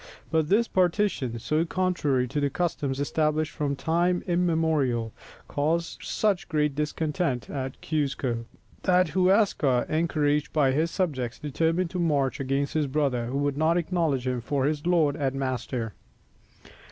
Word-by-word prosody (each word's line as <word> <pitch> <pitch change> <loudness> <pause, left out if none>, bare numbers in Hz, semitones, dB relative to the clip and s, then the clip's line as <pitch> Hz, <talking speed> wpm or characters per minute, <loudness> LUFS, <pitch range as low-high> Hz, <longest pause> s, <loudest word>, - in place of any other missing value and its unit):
But 160 -1 +1
this 225 +4 +3
partition, 180 - +1
so 155 +7 0
contrary 165 -8 0
to 145 - -1
the 145 -1 +1
customs 140 -4 -2
established 155 +1 0
from 145 -2 -2
time 175 +4 +1
immemorial, 160 - +1 0.3
caused 165 +4 -1
such 205 -4 0
great 150 -3 +1
discontent 150 -2 -2
at 130 -2 -4
Cuzco, 135 -6 -1 0.4
that 180 -2 +3
Huascar, 180 - +3
encouraged 150 -2 +1
by 145 -4 +3
his 155 +5 +1
subjects, 135 -10 -2
determined 165 +4 0
to 180 - -3
march 145 -6 +1
against 135 +1 -1
his 155 -2 +1
brother, 135 -4 0
who 130 +3 -2
would 145 0 0
not 160 +2 +3
acknowledge 165 -7 0
him 125 -1 -1
for 135 +3 -1
his 150 +2 -1
lord 160 -5 +3
and 135 -3 -1
master. 130 -4 -3
150 Hz, 140 wpm, -26 LUFS, 135-170 Hz, 0.4 s, this